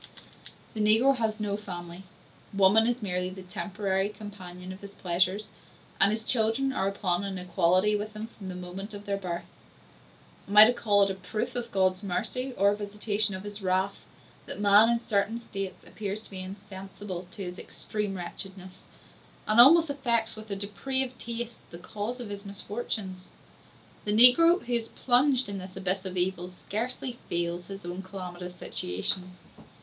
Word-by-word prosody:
The 215 - -2
negro 225 +6 +5
has 220 -2 -1
no 205 -1 -1
family; 175 -3 -7 0.5
woman 200 +3 +5
is 240 -1 -1
merely 180 -2 -1
the 190 0 -9
temporary 195 +1 -2
companion 185 -4 -9
of 185 - -13
his 200 0 -11
pleasures, 185 +3 0 0.5
and 195 - +6
his 220 +1 -2
children 245 +4 +2
are 190 - 0
upon 195 -2 -1
an 195 -1 -4
equality 185 +3 +2
with 210 +1 -4
himself 220 +2 -8
from 195 -3 -8
the 180 - -5
moment 185 +3 -7
of 205 0 -9
their 200 - -1
birth. 175 -3 -4 1.0
Am 205 +1 -2
I 210 - +13
to 240 - +3
call 205 -4 +3
it 195 - +1
a - - -2
proof 215 +6 -4
of 240 -1 -3
God's 185 -1 +2
mercy 250 +7 -2
or 200 +1 +5
a - - 0
visitation 205 0 0
of 190 - -7
his 205 0 -7
wrath, 190 +1 0 0.5
that - - -5
man 205 +2 +6
in 235 0 +2
certain 220 0 0
states 195 -5 -6
appears 210 0 -5
to - - -14
be 190 - -6
insensible 190 -1 -8
to 195 - -7
his 180 0 -6
extreme 210 -2 -4
wretchedness, 185 +1 -7 0.6
and 215 +2 +7
almost 320 +4 +7
affects, 235 -5 0
with 215 0 -11
a 200 - -2
depraved 255 +6 -2
taste, 235 0 -5
the 170 - -9
cause 210 +7 -5
of 240 -4 -6
his 200 0 -6
misfortunes? 200 -2 -5 0.8
The 210 - 0
negro, 330 - +8
who 245 - -4
is 230 -1 0
plunged 260 +2 +3
in 200 -1 -4
this 185 0 -9
abyss 190 0 -1
of 185 -1 -4
evils, 180 0 -1
scarcely 240 +5 -4
feels 170 0 -1
his 195 -1 -8
own 175 +2 -5
calamitous 180 -2 -8
situation. 180 - -2
200 Hz, 175 wpm, -28 LUFS, 185-220 Hz, 1.0 s, I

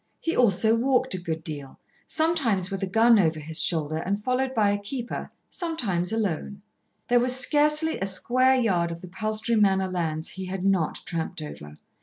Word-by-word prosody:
He 330 - -2
also 220 -1 +4
walked 255 +2 +1
a 185 - -3
good 160 -2 -4
deal, 145 -5 -7 0.3
sometimes 260 - +1
with 195 - -3
a 195 - -1
gun 225 +3 +5
over 160 -4 +2
his 160 +2 -3
shoulder 155 -2 0
and 195 +5 -2
followed 255 +4 -1
by 210 -3 +3
a 205 - -1
keeper, 235 +4 -5 0.2
sometimes 220 - -2
alone. 200 -2 -2 0.4
There 245 0 +4
was 250 +1 +2
scarcely 300 +3 +2
a 195 - -1
square 255 +7 +2
yard 180 -8 +1
of 170 0 -7
the 185 - -9
Palstrey 215 +4 -1
Manor 190 -2 +2
lands 160 -3 -2
he 190 0 -7
had 185 0 -4
not 190 -5 +1
tramped 165 -1 -4
over. 75 - -9
200 Hz, 180 wpm, -25 LUFS, 175-245 Hz, 0.4 s, gun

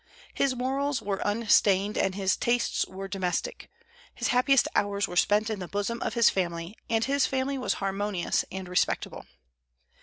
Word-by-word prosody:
His 275 -2 +1
morals 270 +2 -1
were 200 -1 -3
unstained, 205 -2 +2
and 190 - 0
his 190 -1 +1
tastes 240 0 0
were 195 +1 -7
domestic. 185 -2 -3 0.5
His - - -1
happiest 255 +2 +4
hours 200 0 +1
were 175 - -7
spent 210 +4 +3
in 210 - -3
the 180 - -5
bosom 205 +4 -3
of - - -2
his 235 -2 +5
family; 170 +1 -1
and 225 0 +1
his 280 0 +2
family 265 +1 -1
was 255 - 0
harmonious 195 -1 -1
and 190 -1 -6
respectable. 180 0 -1
205 Hz, 160 wpm, -27 LUFS, 190-245 Hz, 0.5 s, his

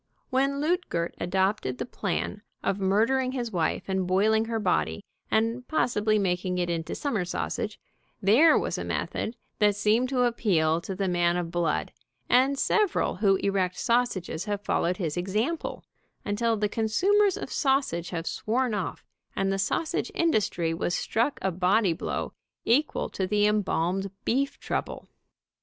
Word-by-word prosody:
When 275 +2 +1
Luetgert 295 - -1
adopted 190 -7 0
the - - -3
plan 205 -2 -3 0.2
of 195 0 0
murdering 230 +7 +2
his 240 -3 -3
wife 175 -1 0
and 190 -1 -1
boiling 215 +4 +3
her 225 0 -2
body 80 - 0 0.2
and 230 +3 0
possibly 215 -8 +1
making 180 -2 0
it 175 -1 0
into 165 -1 -3
summer 235 -10 -1
sausage, 175 - -3 0.4
there 255 - +6
was - - -1
a - - -3
method 225 - -3 0.2
that 210 -2 +4
seemed 215 +5 +2
to 255 -2 +2
appeal 170 -9 +2
to 190 - -5
the 195 0 -1
man 175 -1 +2
of 170 -2 -3
blood, 170 -3 0 0.4
and 265 +3 +4
several 415 - +1
who 195 -1 +4
erect 190 -2 0
sausages 230 -8 0
have 205 0 -3
followed 180 -2 +1
his 165 -5 -2
example, 215 - -2 0.4
until 225 +2 0
the 210 0 +1
con 220 +2 -2
sumers 400 - +3
of - - -6
sausage 265 - +1
have 165 -2 -4
sworn 240 +5 -1
off, 200 -4 -4 0.3
and 195 0 0
the 195 - -2
sausage 310 +11 -1
industry 200 - +1
was 175 +1 -1
struck 235 +6 0
a 190 - +1
body 185 +2 +2
blow 165 - -4 0.3
equal 285 +7 +2
to 190 - -3
the 205 +1 +2
em 210 0 +3
balmed 190 +1 -1 0.2
beef 275 +3 0
trouble. - - -4
205 Hz, 155 wpm, -27 LUFS, 180-245 Hz, 0.4 s, there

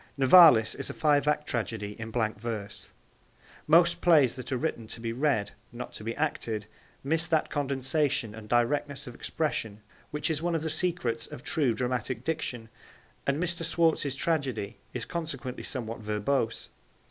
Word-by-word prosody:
Nivalis 135 -5 +8
is 135 - -5
a - - -6
five 145 -2 +3
act 150 0 +1
tragedy 110 -4 -3
in 110 0 -5
blank 110 -2 -1
verse. 110 -3 -6 0.8
Most 170 +2 +5
plays 150 -9 +5
that 130 0 -7
are 130 - +1
written 120 -5 -3
to 115 - -6
be 115 0 -3
read, 125 -6 +1 0.2
not 125 +1 -7
to - - -8
be 115 +1 -3
acted, 115 -8 -2 0.4
miss 160 +4 +1
that 160 -2 +1
condensation 140 -3 0
and 110 -1 -10
directness 140 +4 +1
of 125 - -8
expression 110 -9 -3 0.3
which 150 +2 -1
is 155 -1 -2
one 170 0 0
of 160 - -1
the 160 - -2
secrets 155 -9 -1
of 120 - -10
true 135 -8 +2
dramatic 125 0 -2
diction, 130 -7 -2 0.6
and 140 +1 +2
Mr. 170 0 -1
Schwartz's 165 -4 +1
tragedy 135 -9 -1
is - - -4
consequently 140 -7 -4
somewhat 115 -4 -5
verbose. 110 +3 -1
135 Hz, 160 wpm, -28 LUFS, 115-155 Hz, 0.8 s, Nivalis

